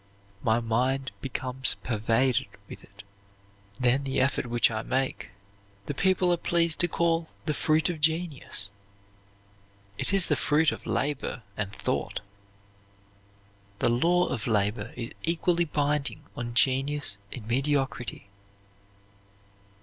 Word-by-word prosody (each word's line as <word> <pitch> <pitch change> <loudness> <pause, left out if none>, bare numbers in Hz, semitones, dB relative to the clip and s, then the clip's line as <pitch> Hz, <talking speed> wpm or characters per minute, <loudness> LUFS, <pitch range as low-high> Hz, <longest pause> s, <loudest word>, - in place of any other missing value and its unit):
My 110 +1 +2
mind 125 +3 0
becomes 130 0 0
pervaded 120 +3 +1 0.2
with - - -10
it. - - -15 0.8
Then 125 +2 +2
the 135 0 -1
effort 130 -1 +1
which 120 -1 +3
I 110 -1 -2
make 130 -5 -2 0.6
the - - -3
people 185 +3 +3
are - - +1
pleased 170 -1 +2
to 175 - +4
call 165 -1 +1 0.2
the 155 - 0
fruit 155 +1 +2
of 170 -4 -3
genius; 155 - +1 1.3
it - - -1
is 195 -3 +5
the - - +2
fruit 155 +1 +3
of - - -7
labor 140 -4 -1
and 100 -2 -2
thought." - - -2 1.6
The - - +2
law 170 +9 +3
of 115 -3 -3
labor 105 0 0
is 120 -1 -5
equally 170 +1 +1
binding 145 -1 0
on 120 0 -5
genius 135 -2 +1
and 120 -5 -6
mediocrity. 135 -4 -1
135 Hz, 125 wpm, -27 LUFS, 120-160 Hz, 1.6 s, is